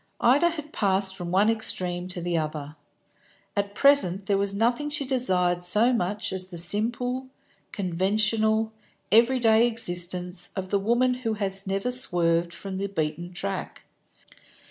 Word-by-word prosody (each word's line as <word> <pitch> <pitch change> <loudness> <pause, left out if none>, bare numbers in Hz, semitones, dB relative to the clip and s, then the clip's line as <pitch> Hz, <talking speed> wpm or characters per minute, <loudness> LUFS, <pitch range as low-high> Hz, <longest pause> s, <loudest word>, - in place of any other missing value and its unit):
Ida 290 +8 +4
had 305 -3 -8
passed 190 -2 +2
from 175 -3 -6
one 195 +4 +2
extreme 180 -5 +1
to 180 -1 -5
the 175 0 -2
other. 150 -2 -4 0.8
At 200 0 -2
present 210 -10 +3
there 195 -1 +1
was 200 0 -1
nothing 240 +7 0
she 290 -1 -3
desired 180 -9 +1
so 215 +8 +4
much 205 -1 -2
as 185 -1 -1
the 180 -2 -9
simple, 240 +8 0 0.4
conventional, 215 +4 0 0.4
every 235 +4 +4
day 225 -1 +4
existence 180 -5 -1
of 185 -1 -5
the 200 - +1
woman 240 +5 +1
who 225 -3 -2
has 195 -2 -2
never 195 +6 -1
swerved 170 -8 +1
from 190 +3 -7
the 200 +1 -2
beaten 170 -1 -4
track. 100 - -4
200 Hz, 145 wpm, -25 LUFS, 180-230 Hz, 0.8 s, Ida